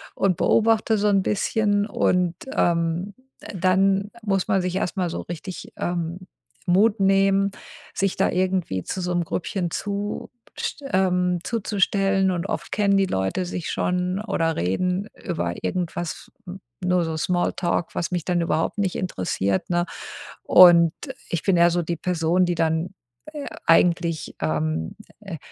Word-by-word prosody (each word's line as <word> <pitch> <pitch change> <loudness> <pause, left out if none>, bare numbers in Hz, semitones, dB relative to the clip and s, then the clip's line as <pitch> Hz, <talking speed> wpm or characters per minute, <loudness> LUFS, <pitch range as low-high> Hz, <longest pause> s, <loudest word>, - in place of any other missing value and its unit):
und 195 -2 +2
beobachte 225 0 +3
so 210 +1 +1
'n 195 -1 +3
bisschen 205 +1 +1
und, 180 -4 +1 0.2
ähm, 170 +3 0 0.3
d - - -9
dann 195 +2 +2
muss 195 -3 0
man 195 -3 +2
sich 180 +1 -1
erst 195 0 -2
mal 180 -2 0
so - - -4
richtig, 175 +2 -8
ähm, 175 +1 -3 0.4
Mut 200 +4 +3
nehmen, 195 0 +3 0.4
sich 195 -1 0
da - - +2
irgendwie 180 - 0
zu 190 - -4
so 180 0 -2
'nem 175 0 +1
Grüppchen 180 +1 -2
zust 205 0 -4 0.6
ähm, 180 -2 +2
zuzustellen 195 -3 +1
und 175 -2 -2
oft - - -4
kennen 200 -1 +2
die 195 - +3
Leute 95 - -1
sich 175 -1 -4
schon 180 +1 -1
oder 165 -7 -1
reden 180 - -1 0.2
über 85 - -2
irgendwas 175 -2 -3 0.5
nur 180 -2 +2
so 160 -1 -3
Smalltalk, 175 0 -1
was 170 - -2
mich 175 -3 -2
dann 175 -2 +1
überhaupt 165 +3 -1
nicht 190 -3 0
interessiert, 95 - -1
ne? 175 0 +1 0.6
Und 170 -2 +7 0.4
ich 170 - -1
bin 190 -3 +3
eher 170 0 +5
so 175 +1 0
die 170 +1 -3
Person, 175 +1 +1
die 175 - 0
dann, 165 +3 0 0.4
äh, 295 -2 -6 0.2
eigentlich, 165 -1 +2
ähm 80 0 -1 0.3
äh, 195 -6 -7
180 Hz, 150 wpm, -23 LUFS, 170-195 Hz, 0.6 s, Und